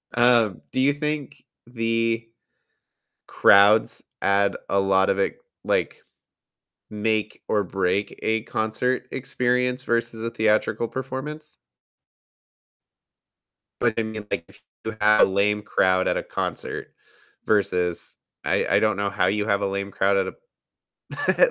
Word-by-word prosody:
Um, 120 Hz, -5 st, +3 dB
do 130 Hz, -, -2 dB
you 140 Hz, +2 st, +4 dB
think 145 Hz, -2 st, -4 dB, 0.2 s
the 115 Hz, -1 st, -1 dB, 1.0 s
crowds 100 Hz, +2 st, +5 dB, 0.2 s
add 100 Hz, 0 st, +2 dB
a 100 Hz, -, +2 dB
lot 95 Hz, 0 st, +3 dB
of 100 Hz, -, +1 dB
it, 100 Hz, -, 0 dB, 0.3 s
like -, -, -1 dB, 0.9 s
make 105 Hz, 0 st, -2 dB
or 105 Hz, -1 st, +2 dB
break 95 Hz, +1 st, -1 dB
a 110 Hz, 0 st, +1 dB
concert 125 Hz, +4 st, -1 dB
experience 125 Hz, 0 st, 0 dB
versus 115 Hz, -2 st, -1 dB
a 115 Hz, -, -1 dB
theatrical 110 Hz, +1 st, +1 dB
performance? 135 Hz, +5 st, -6 dB, 2.2 s
But, 120 Hz, -2 st, +2 dB
I 115 Hz, -, +1 dB
mean, 110 Hz, -1 st, -6 dB
like, 85 Hz, -, -2 dB
if -, -, -18 dB, 0.2 s
you 110 Hz, -, -4 dB
have 105 Hz, 0 st, +5 dB
a -, -, -5 dB
lame 105 Hz, +2 st, +1 dB
crowd 95 Hz, -3 st, +2 dB
at -, -, +1 dB
a -, -, -3 dB
concert -, -, -4 dB, 0.5 s
versus 90 Hz, -4 st, 0 dB, 0.3 s
I -, -, +1 dB
I -, -, +4 dB
don't 110 Hz, 0 st, +1 dB
know 100 Hz, 0 st, 0 dB
how -, -, 0 dB
you 105 Hz, 0 st, 0 dB
have 100 Hz, -2 st, +1 dB
a -, -, 0 dB
lame 100 Hz, 0 st, -3 dB
crowd 100 Hz, +1 st, +2 dB
at 95 Hz, -, +1 dB, 0.7 s
a -, -, +2 dB
110 Hz, 135 wpm, -24 LUFS, 100-120 Hz, 2.2 s, crowds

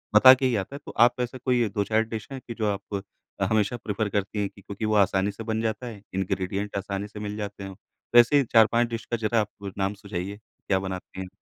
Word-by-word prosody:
बता 130 Hz, +4 st, +10 dB
के 130 Hz, 0 st, 0 dB
ही 125 Hz, -2 st, +2 dB
आता 100 Hz, +7 st, -3 dB
है, -, -, -6 dB
तो -, -, -7 dB
आप 120 Hz, +1 st, +4 dB
ऐसा 125 Hz, +1 st, -3 dB
कोई 125 Hz, -3 st, +3 dB
2-4 105 Hz, +2 st, +1 dB
डिश 110 Hz, -1 st, -6 dB
हैं, 135 Hz, -, -5 dB
कि 120 Hz, -, -4 dB
जो 110 Hz, -1 st, -2 dB
आप 100 Hz, 0 st, -4 dB, 0.5 s
हमेशा 110 Hz, +2 st, +2 dB
प्रेफ़र 105 Hz, -1 st, -2 dB
करती 100 Hz, +1 st, -2 dB
है, 100 Hz, -, 0 dB
कि 100 Hz, -, -17 dB
क्योंकि 100 Hz, +2 st, -5 dB
वो 110 Hz, 0 st, +1 dB
आसानी 100 Hz, 0 st, +3 dB
से 115 Hz, +3 st, -8 dB
बन 110 Hz, 0 st, -1 dB
जाता 115 Hz, +2 st, -2 dB
है, 110 Hz, -4 st, -8 dB
इंग्रीडिएंट 95 Hz, +2 st, -2 dB
आसानी 100 Hz, +1 st, -3 dB
से 105 Hz, 0 st, -10 dB
मिल 105 Hz, 0 st, -4 dB
जाते 100 Hz, -1 st, -5 dB
हैं। 95 Hz, -1 st, -7 dB, 0.4 s
वैसे 120 Hz, +4 st, +7 dB
ही 140 Hz, -, +4 dB
4-5 115 Hz, +1 st, +5 dB
डिश 115 Hz, -1 st, -5 dB
का 120 Hz, -, -2 dB
ज़रा 110 Hz, 0 st, +1 dB
आप 100 Hz, -1 st, -6 dB
नाम 95 Hz, +1 st, 0 dB
सुझाइए, 100 Hz, 0 st, -5 dB
क्या 100 Hz, -2 st, -3 dB
बनाती 95 Hz, 0 st, -6 dB
हैं? 95 Hz, -, -5 dB
105 Hz, 235 wpm, -26 LUFS, 100-115 Hz, 0.5 s, बता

